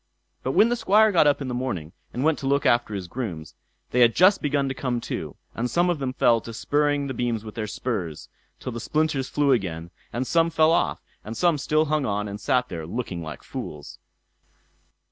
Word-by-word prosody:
But - - -2
when 225 - +5
the 240 - +1
Squire 220 -1 +4
got 165 -5 +5
up 145 0 +2
in - - -5
the 125 - -3
morning, 95 -11 -3 0.2
and 125 - -3
went 160 0 +2
to 135 - -4
look 140 +1 +2
after 120 -3 +2
his 95 -3 -5
grooms, 85 -8 -5 0.4
they 125 - +1
had 120 -2 +5
just 190 +3 +5
begun 145 -1 +1
to 135 - -2
come 125 -2 -2
to; - - -5 0.2
and 120 +2 -2
some 175 +4 +2
of 165 - -2
them 135 -2 -2
fell 115 -2 +3
to 115 - -8
spurring 145 +2 +1
the 135 - -3
beams 120 -3 -1
with 110 - -8
their 110 -2 -4
spurs, 100 -8 -4 0.3
till 125 - -5
the 120 - -5
splinters 150 0 0
flew 145 -1 +2
again, 85 -8 -1 0.2
and 125 +2 -2
some 165 +4 +3
fell 160 0 +4
off, 170 - +1 0.2
and 110 +2 -7
some 170 -4 +2
still 155 +3 +2
hung 150 -2 0
on 105 0 -1
and 100 0 -7
sat 125 +3 +1
there 80 -6 -6
looking 95 -4 -4
like 80 -2 -8
fools. 75 -1 -7
125 Hz, 220 wpm, -25 LUFS, 105-150 Hz, 0.4 s, when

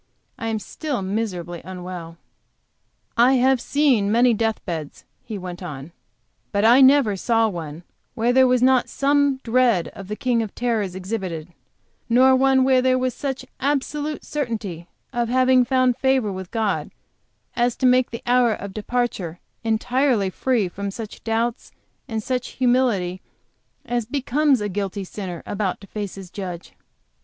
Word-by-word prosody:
I 225 - -3
am 225 -1 0
still 285 +6 -4
so - - -3
miserably 185 -4 -3
unwell. 180 -2 -8 1.0
"I 245 +3 +6
have 260 -1 +3
seen 260 -9 +2
many 240 +2 +4
death 225 0 0
beds," 160 -5 -6 0.2
he 220 -3 -6
went 180 -1 -7
on; 150 -3 -7 0.6
"but 200 0 +1
I 245 +4 +7
never 265 -6 +5
saw 225 +3 +2
one 165 -4 -6 0.3
where 235 +1 +1
there 260 0 +6
was 250 -1 +2
not 255 -1 +4
some 285 -1 +2
dread 235 -6 +2
of 195 - -10
the 210 - -4
King 240 0 +1
of 215 -3 -5
Terrors 220 -6 -1
exhibited; 185 -4 -4 0.6
nor 260 +2 +6
one 265 0 +4
where 260 -1 +4
there 255 0 +3
was 255 -1 0
such 270 -2 -4
absolute 290 +2 -1
certainty 215 - -4 0.3
of 240 -2 0
having 255 0 +4
found 255 -1 +2
favor 265 -5 +2
with 190 -1 -6
God 220 -3 -1 0.7
to 245 +2 +1
make 255 0 +4
the 230 - -7
hour 245 -2 +4
of 200 -1 -8
departure 215 -6 -2 0.3
entirely 230 -2 +1
free 240 -2 0
from 200 +3 -5
such 215 +2 -8
doubts 230 +1 -1 0.4
and 220 -4 -3
such 255 0 -3
humility 240 -8 +1 0.6
as 240 -2 -2
becomes 275 0 +1
a 210 - -1
guilty 200 0 -3
sinner 185 -3 -7
about 200 -2 -2
to 200 - -12
face 205 0 -5
his 190 -2 -10
Judge." 180 -3 -7
230 Hz, 155 wpm, -22 LUFS, 195-255 Hz, 1.0 s, I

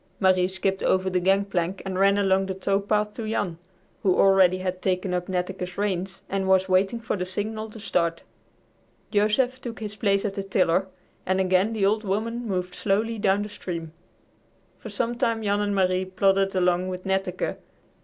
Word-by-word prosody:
Marie 185 -2 +4
skipped 190 +1 -2
over 190 0 +1
the 180 - +2
gangplank 190 -1 0
and 190 -1 -3
ran 200 +1 +4
along 195 -1 +2
the 190 - -3
tow 195 +1 0
path 210 +1 0
to 220 -1 -5
Jan, 180 -6 -2 0.4
who 185 -2 +2
already 190 -2 +5
had 185 0 -4
taken 185 -1 0
up 180 0 -2
Netteke's 180 0 -3
reins 195 -2 -2
and 195 -1 -2
was 190 0 +4
waiting 190 +5 +2
for 230 -1 -2
the 185 - -2
signal 215 +4 -4
to 220 - -11
start. 170 -5 -1 0.9
Joseph 235 +5 +2
took 235 -3 -6
his 210 -2 -6
place 200 -1 +1
at 200 - -1
the 195 - -3
tiller, 190 -1 +1 0.4
and 190 +1 0
again 190 +3 +2
the 210 -3 +1
"Old 215 +2 +2
Woman" 225 +4 -2
moved 180 -2 -2
slowly 215 +4 0
down 200 0 +2
the 210 - -6
stream. 170 -6 -6 0.9
For 220 - -8
some 230 +3 -1
time 230 -2 0
Jan 205 0 +1
and 205 -1 0
Marie 185 -1 +2
plodded 195 +1 +1
along 180 0 +2
with 185 0 -5
Netteke. 190 -1 -1
195 Hz, 185 wpm, -25 LUFS, 185-205 Hz, 0.9 s, already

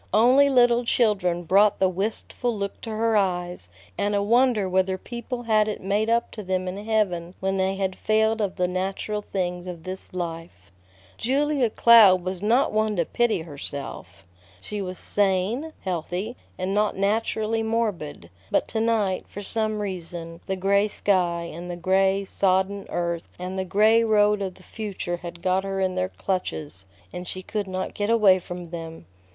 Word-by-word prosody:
Only 255 +6 +6
little 245 -2 +4
children 195 -8 +1
brought 200 +4 +4
the 190 - +3
wistful 215 +4 -2
look 200 0 -4
to 230 - -7
her 220 +1 +1
eyes, 180 - -1 0.3
and 205 0 +1
a 200 - +1
wonder 235 -2 +3
whether 190 0 +1
people 240 +4 -6
had 215 -2 +3
it 210 - -3
made 205 +3 0
up 235 +1 +1
to 215 - -7
them 185 -1 -2
in 195 +3 -5
heaven 190 -6 0
when 195 0 -1
they 190 0 +1
had 190 -1 -2
failed 220 +1 +1
of 200 -3 -1
the 180 -1 +1
natural 195 +3 -2
things 180 -3 -3
of 170 -3 -7
this 185 0 -4
life. 165 - -6 0.5
Julia 275 0 +1
Cloud 210 -6 +7
was 185 0 -4
not 235 +6 +3
one 215 0 +1
to 170 -3 +1
pity 225 -4 +1
herself. 140 - -7 0.3
She 210 - -5
was 185 -1 -5
sane, 205 +9 0
healthy, 185 +5 -3 0.2
and 185 +1 -2
not 210 0 +1
naturally 220 +2 0
morbid; 210 - -2 0.2
but - - +1
to 220 - -1
night, 215 -5 0
for 205 - -7
some 215 +1 0
reason, 170 -4 -6
the 190 - -1
gray 200 +2 +2
sky, 180 -5 +1
and 175 +2 -7
the 175 - -4
gray, 190 +2 +2
sodden 195 +1 0
earth, 170 -1 -3
and 185 +1 -4
the 190 - -1
gray 215 +4 +4
road 210 -2 +3
of 190 -2 -3
the 185 - -17
future 195 -5 -4
had 175 -1 -9
got 185 +1 +2
her 195 0 -3
in 190 -1 +1
their 185 0 -1
clutches, 155 - -3 0.3
and 180 0 -6
she 185 +1 -5
could 210 0 -3
not 185 0 -4
get 205 +1 -2
away 210 -5 +5
from 175 -1 -8
them. 165 - -7
195 Hz, 175 wpm, -25 LUFS, 180-215 Hz, 0.5 s, Cloud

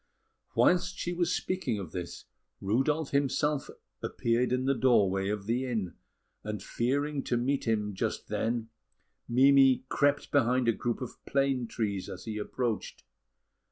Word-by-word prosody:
Whilst 180 +1 +3
she 175 - -2
was 175 -1 0
still - - -1
speaking 180 - -1
of 95 -5 -6
this, 90 -2 -6 0.3
Rudolf 135 +9 0
himself 140 +1 +1 0.3
appeared 120 +1 0
in 125 +1 0
the 135 - +3
doorway 100 -7 +3
of 105 -1 -3
the 125 +4 0
inn; 110 -8 -2 0.5
and, 105 -2 -4
fearing 140 +6 -1
to 120 - +1
meet 130 +2 -1
him 105 -2 0
just 95 - -3
then, 115 0 -1 0.6
Mimi 135 +1 +5
crept 145 0 +1
behind 130 -2 +3
a - - +6
group 120 +3 -3
of 125 - -7
plane 135 -3 +1
trees 100 -4 -3
as 90 - -8
he 110 -2 -4
approached. 110 -2 -3
125 Hz, 150 wpm, -30 LUFS, 105-140 Hz, 0.6 s, a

